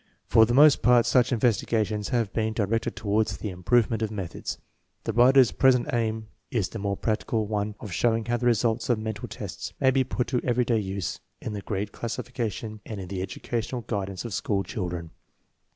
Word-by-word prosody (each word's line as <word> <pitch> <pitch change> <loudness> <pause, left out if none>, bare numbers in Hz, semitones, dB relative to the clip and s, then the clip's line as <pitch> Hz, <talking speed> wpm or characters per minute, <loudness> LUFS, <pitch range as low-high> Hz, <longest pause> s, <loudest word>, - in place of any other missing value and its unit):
For 110 -1 +5
the 120 - 0
most 145 0 +7
part 120 -1 +5
such 125 -1 +3
investigations 110 -3 +1
have 115 -5 0
been 110 -1 0
di 110 -2 0
rected 115 +3 -1
toward 110 0 +1
the 100 0 -4
improvements 110 +5 +1
of 110 - -1
methods. 100 -5 -5 0.5
The 115 - -2
writer's 125 +2 +6
present 130 0 +3
i 115 -2 +2 0.4
is 105 -7 -1
the 110 - -6
more 100 -1 -2
practical 110 0 -1
one 105 0 -2
of 105 - -8
show 115 +3 +2
ing 115 -1 -3
how 120 0 0
the 120 +1 0
results 115 0 +1
of 120 - +3
mental 110 -1 -4
tests - - -7
may 130 - +4
be 130 0 +3
put 125 -1 -2
to 125 -2 0
everyday 120 -2 +2
use 95 -2 -3 0.2
hi - - -3
the 105 -2 -4
grade 100 0 -3
classification 115 -2 -4
and 110 -3 -6
in 95 -2 -7
the 95 -2 -3
educational 115 +6 -3
guidance 100 -3 -4
of 115 - -5
school 100 -4 0
children. 85 -5 -4
110 Hz, 195 wpm, -26 LUFS, 100-120 Hz, 0.5 s, most